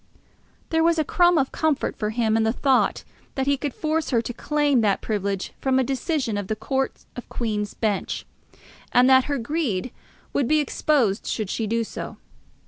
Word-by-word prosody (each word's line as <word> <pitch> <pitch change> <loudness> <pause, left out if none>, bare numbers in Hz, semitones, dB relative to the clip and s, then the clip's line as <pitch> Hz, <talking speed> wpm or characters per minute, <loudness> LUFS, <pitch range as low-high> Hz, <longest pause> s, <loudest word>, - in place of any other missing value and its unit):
There 325 0 +3
was 335 0 +3
a 315 - +2
crumb 350 +3 +3
of 270 -2 +1
comfort 310 -3 0
for 210 - -2
him 220 -1 +1
in 225 - +3
the 220 0 +2
thought 265 +1 +2 0.3
that 265 - 0
he 280 0 +3
could 285 +1 -3
force 315 0 -1
her 240 - +3
to 235 +1 -4
claim 290 -1 +1
that 205 -3 +2
privilege 200 -3 -2
from 265 -1 +2
a 265 - +3
decision 265 - -1
of 200 - -5
the 215 - -1
Court 265 +4 -2
of 245 - -9
Queen's 210 -3 -2
Bench, 210 -3 -2 0.7
and 250 +1 +5
that 260 -1 +6
her 285 -1 -1
greed 250 - -2 0.4
would 275 - +1
be 310 - +3
exposed 275 -7 +1
should 215 -4 -2
she 225 - -2
do 230 +2 0
so. - - -7
255 Hz, 190 wpm, -24 LUFS, 220-290 Hz, 0.7 s, that